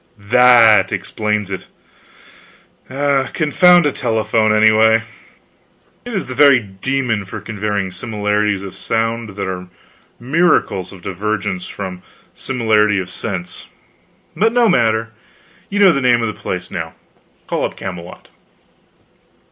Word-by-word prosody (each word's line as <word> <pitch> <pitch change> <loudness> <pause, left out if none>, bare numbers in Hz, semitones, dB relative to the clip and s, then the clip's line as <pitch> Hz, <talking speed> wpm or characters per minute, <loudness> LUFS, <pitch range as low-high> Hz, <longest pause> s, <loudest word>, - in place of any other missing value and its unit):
"That 115 +1 +5
explains 105 -2 -2
it. 95 - -6 1.2
Confound 145 +6 +2
a 145 - +2
telephone, 110 -3 0
anyway. 110 +1 +4 1.0
It 245 -2 -6
is 190 - -2
the 130 - -7
very 140 -1 +5
demon 115 +2 -3
for 95 - -8
conveying 105 -3 -3
similarities 105 -2 -2
of 95 - -8
sound 115 -2 -2
that 100 -1 -4
are 90 -1 -6 0.5
miracles 130 - +1
of 95 -3 -14
divergence 100 -1 -3
from 90 -1 -7 0.3
similarity 110 -5 +1
of 90 -2 -4
sense. 95 -5 -5 0.7
But 220 +7 +1
no 240 -1 +3
matter, 115 - +1 0.6
you 200 - -3
know 200 -2 +6
the 140 -4 -1
name 120 -2 +3
of - - 0
the 110 - -4
place 90 -1 -6
now. 80 -1 -6 0.5
Call - - -2
up - - -3
Camelot." 90 -2 -9
110 Hz, 125 wpm, -17 LUFS, 100-130 Hz, 1.2 s, know